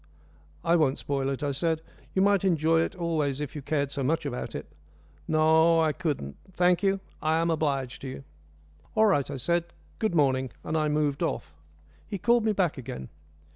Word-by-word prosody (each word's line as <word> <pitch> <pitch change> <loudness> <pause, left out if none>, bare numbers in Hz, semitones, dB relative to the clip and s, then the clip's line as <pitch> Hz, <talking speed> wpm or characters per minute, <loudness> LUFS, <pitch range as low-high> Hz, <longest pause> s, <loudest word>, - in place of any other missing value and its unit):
"I 170 +1 +4
won't 145 -4 +2
spoil 135 -1 -1
it," 135 +1 -3
I 145 - 0
said. 160 +3 -1 0.3
"You 190 - +4
might 200 -1 +3
enjoy 165 -3 +3
it - - -2
always 155 -6 -1
if 150 0 -5
you 150 - -4
cared 140 0 -1
so 140 - -3
much 150 +4 0
about 125 -3 -4
it." - - -5 0.6
"No, 160 +1 +4
I 160 -2 +2
couldn't. 145 - -3 0.2
Thank 180 0 +3
you. 195 -1 +1 0.2
I 155 +1 +2
am 165 +1 +1
obliged 140 -5 -1
to 135 - -6
you." 130 +1 -7 0.7
"All 220 - +5
right," 145 -11 +2
I 140 - -4
said. 170 +6 +1 0.3
"Good 215 -5 0
morning," 130 -3 +2
and 155 - -3
I 155 -1 +2
moved 150 -2 0
off. - - -2 0.5
He 200 - -4
called 235 +4 +3
me 220 - +3
back 180 -8 0
again. 125 - -7
155 Hz, 190 wpm, -27 LUFS, 140-170 Hz, 0.7 s, All